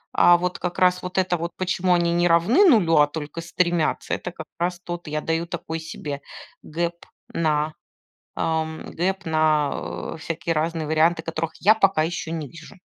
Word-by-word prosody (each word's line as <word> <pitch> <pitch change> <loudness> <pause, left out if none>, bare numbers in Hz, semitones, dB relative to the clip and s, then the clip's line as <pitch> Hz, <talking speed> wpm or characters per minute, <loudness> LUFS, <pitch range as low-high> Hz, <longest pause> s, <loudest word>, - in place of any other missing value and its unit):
А 175 0 +7
вот 180 +1 -2
как 180 -1 -3
раз 180 0 +3
вот 180 +1 -6
это 185 -1 +2
вот, 170 +1 -4
почему 185 0 +1
они 170 -1 +2
не 175 +1 +3
равны 175 - +4
0, 180 - +4
а 150 0 +6
только 150 +2 -6
стремятся, 170 -1 0
это 180 - -3
как 160 -2 -9
раз 175 0 -1
тот 175 -1 -7
я 150 0 -2
даю 165 +1 -1
такой 165 -1 -5
себе 145 -3 -6 0.4
гэп 170 +2 -2 0.4
на 155 -1 0 0.6
ам, 160 -1 -2
гэп 190 +2 -2
на, 155 -2 +2 0.4
а, - - -7
всякие 165 +1 -3
разные 160 0 -1
варианты, 160 +2 +2
которых 165 0 -3
я 210 +3 +5
пока 195 -7 +3
ещё 165 0 -3
не 160 -4 -4
вижу. 165 +7 -13
165 Hz, 175 wpm, -23 LUFS, 160-175 Hz, 0.6 s, А